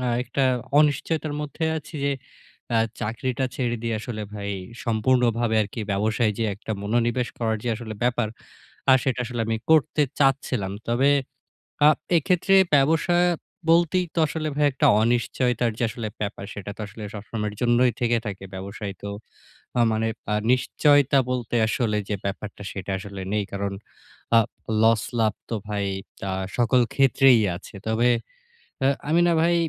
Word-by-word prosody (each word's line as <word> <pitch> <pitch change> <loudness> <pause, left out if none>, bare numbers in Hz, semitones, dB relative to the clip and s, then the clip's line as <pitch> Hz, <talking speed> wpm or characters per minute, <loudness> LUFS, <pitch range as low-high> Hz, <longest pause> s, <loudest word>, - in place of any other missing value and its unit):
আ - - 0 0.2
একটা 130 +2 -2 0.4
অনিশ্চয়তার 150 +1 +1
মধ্যে 150 +2 -4
আছি 150 - -13
যে 140 - +2 0.6
আ - - +4 0.2
চাকরিটা 125 +4 -2
ছেড়ে 120 -2 -1
দিয়ে 115 -1 -1
আসলে 110 -2 -5
ভাই 100 -1 -4 0.3
সম্পূর্ণভাবে 115 0 +2
আরকি 105 +3 -6
ব্যবসায় 110 +2 +1
যে 115 - 0
একটা 110 +2 -10
মনোনিবেশ 120 +3 0
করার 110 -2 0
যে - - -1
আসলে 110 -2 -7
ব্যাপার, 120 -2 +1 0.6
আর 130 - +8
সেটা 130 -2 0
আসলে 120 0 -4
আমি 115 0 0
করতে 155 -1 +4 0.2
চাচ্ছিলাম। 130 -8 +1 0.2
তবে 130 +4 +3 0.8
আ - - +9 0.3
এক্ষেত্রে 180 +4 +2 0.2
ব্যবসা 160 +5 +3 0.6
বলতেই 175 +2 +2
তো - - -1
আসলে 155 0 -3
ভাই 150 - +2
একটা 130 - +2 0.2
অনিশ্চয়তার 120 0 +1
যে - - -2
আসলে 110 -1 -5
ব্যাপার 100 -1 -4
সেটা 100 0 -6
তো - - -10
আসলে 105 +2 -11
সবসময়ের 105 0 -4
জন্যই 120 +1 +3
থেকে 120 -1 +2
থাকে। 95 -1 -5
ব্যবসায় 100 +1 -6
তো 100 - -5 0.7
আ - - +4
মানে 110 +1 0 0.3
আ - - +2 0.2
নিশ্চয়তা 145 +2 +3
বলতে 120 -2 -2
আসলে 110 -2 0
যে 105 - -1
ব্যাপারটা, 100 +1 -5
সেটা 100 0 -6
আসলে 100 0 -8
নেই। 105 -1 +1
কারণ 100 0 -2 0.6
আ - - +9 0.4
লস-লাভ 115 -1 +2 0.2
তো - - -1
ভাই 100 -1 -1 0.4
তা 95 - -2 0.3
সকল 120 +1 +4
ক্ষেত্রেই 135 -2 +5 0.2
আছে। 95 - -12
তবে 110 +2 +2 0.8
আ - - +5 0.2
আমি 165 +3 +4
না - - +4
ভাই 170 +1 +3
120 Hz, 150 wpm, -24 LUFS, 105-135 Hz, 0.8 s, আ